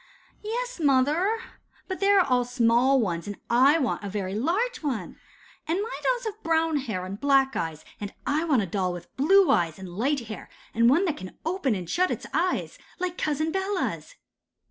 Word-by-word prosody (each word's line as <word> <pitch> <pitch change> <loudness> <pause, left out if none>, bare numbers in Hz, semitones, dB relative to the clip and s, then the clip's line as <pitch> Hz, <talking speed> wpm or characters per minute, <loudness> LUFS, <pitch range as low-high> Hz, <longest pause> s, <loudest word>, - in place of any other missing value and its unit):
'Yes, 485 +1 -4
mother, 300 +9 +2 0.5
but 375 - -4
they 395 +1 +2
are 310 -12 +4
small 245 +2 +3
ones, 175 -5 -2
and 205 - -5
I 265 +6 +5
want 260 -8 -1
a 200 - -4
very 195 -1 -3
large 385 - 0
one. 250 - -3 0.5
And 335 +4 0
my 445 +4 -4
dolls - - 0
have 430 -1 -5
brown 325 -1 +1
hair 215 -10 -3
and 195 +2 -6
black 270 -1 +3
eyes, 160 -2 -4
and 205 -1 -5
I 295 +3 +1
want 270 -10 +2
a - - -2
doll 185 0 -1
with 175 - -10
blue 380 +7 +5
eyes 165 -3 +1
and 190 -1 -8
light 270 +6 0
hair, 220 -2 -8 0.2
and 230 +2 +4
one 330 +9 +4
that 315 -5 -1
can 185 - -9
open 325 - 0
and 180 -3 -5
shut 365 - +1
its - - -4
eyes, 345 +5 -1 0.2
like 360 -1 -3
Cousin 310 0 -1
Bella's. 385 +6 -2
280 Hz, 190 wpm, -26 LUFS, -, 0.5 s, I